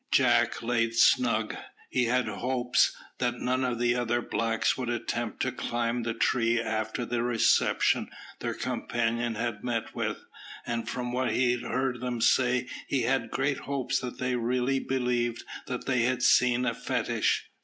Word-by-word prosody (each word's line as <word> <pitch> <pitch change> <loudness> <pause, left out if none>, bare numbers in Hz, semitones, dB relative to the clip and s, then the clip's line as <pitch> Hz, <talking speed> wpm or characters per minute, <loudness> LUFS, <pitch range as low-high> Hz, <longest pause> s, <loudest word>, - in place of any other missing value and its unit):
Jack - - +3
lay 115 -1 +1
snug. 115 -1 +3 0.4
He 125 -1 +2
had 125 +2 +1
hopes 125 0 +1 0.2
that 120 -1 0
none 130 +1 0
of 125 -2 -1
the 120 0 +2
other 120 -1 0
blacks 115 -1 0
would 125 -2 -3
attempt 120 -1 -2
to - - 0
climb 120 0 -2
the 115 -1 -3
tree 115 0 +2
after 110 +1 -2
the 120 0 -1
reception 120 -2 +2 0.3
their - - -3
companion 115 0 -1
had 115 0 -3
met 120 -2 -2
with; - - -3 0.4
and 115 -1 -3
from 125 -1 -3
what 130 +1 0
he 125 -1 +2
heard 130 -1 -1
them 125 -2 -2
say 125 +1 +3 0.2
he 135 -3 0
had 125 -2 0
great 135 +3 0
hopes 135 -1 -1
that 125 -1 -6
they 125 0 -1
really 125 +3 0
believed 125 -3 -1 0.2
they 125 0 -1
had 125 +1 +1
seen 125 -1 +4
a 115 - +1
fetish. - - -1
120 Hz, 155 wpm, -28 LUFS, 115-125 Hz, 0.4 s, seen